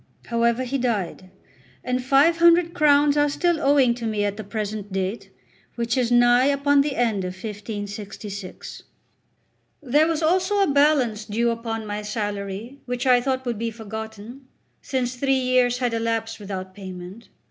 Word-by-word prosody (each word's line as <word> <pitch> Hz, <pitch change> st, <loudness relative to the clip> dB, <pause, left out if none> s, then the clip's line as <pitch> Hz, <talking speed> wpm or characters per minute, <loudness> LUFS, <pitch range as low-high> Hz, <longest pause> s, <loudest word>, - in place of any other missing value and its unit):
However, 235 Hz, +1 st, +1 dB
he 265 Hz, +2 st, -2 dB
died; 200 Hz, -6 st, -2 dB, 0.5 s
and 250 Hz, 0 st, -1 dB
five 280 Hz, +6 st, +4 dB
hundred 340 Hz, 0 st, +5 dB
crowns 290 Hz, -2 st, +4 dB
are 290 Hz, 0 st, +3 dB
still 340 Hz, +2 st, 0 dB
owing 275 Hz, -4 st, +4 dB
to 235 Hz, -1 st, -5 dB
me 210 Hz, -2 st, 0 dB
at 205 Hz, 0 st, -2 dB
the 215 Hz, -, -7 dB
present 210 Hz, -1 st, -5 dB
date, 190 Hz, +3 st, -3 dB, 0.5 s
which 235 Hz, 0 st, -1 dB
is 250 Hz, -2 st, 0 dB
nigh 240 Hz, +1 st, +5 dB
upon 285 Hz, 0 st, +3 dB
the 280 Hz, -1 st, -2 dB
end 225 Hz, -5 st, 0 dB
of 180 Hz, 0 st, -5 dB
1566. 205 Hz, -1 st, -7 dB, 1.0 s
There 295 Hz, +3 st, +2 dB
was 330 Hz, -1 st, -1 dB
also 370 Hz, +5 st, +2 dB
a 340 Hz, -, +1 dB
balance 275 Hz, -7 st, +2 dB
due 230 Hz, +2 st, 0 dB
upon 225 Hz, -1 st, -4 dB
my 210 Hz, 0 st, -4 dB
salary 205 Hz, +3 st, -5 dB
which 245 Hz, +1 st, -3 dB
I 250 Hz, -1 st, +5 dB
thought 260 Hz, 0 st, -2 dB
would 235 Hz, -3 st, -3 dB
be 230 Hz, 0 st, -1 dB
forgotten, 220 Hz, +3 st, -8 dB, 0.3 s
since 255 Hz, -2 st, -2 dB
three 270 Hz, +2 st, +1 dB
years 255 Hz, -1 st, +2 dB
had 245 Hz, -2 st, -1 dB
elapsed 225 Hz, 0 st, -2 dB
without 190 Hz, -2 st, -6 dB
payment. 185 Hz, +2 st, -10 dB
235 Hz, 160 wpm, -23 LUFS, 210-270 Hz, 1.0 s, hundred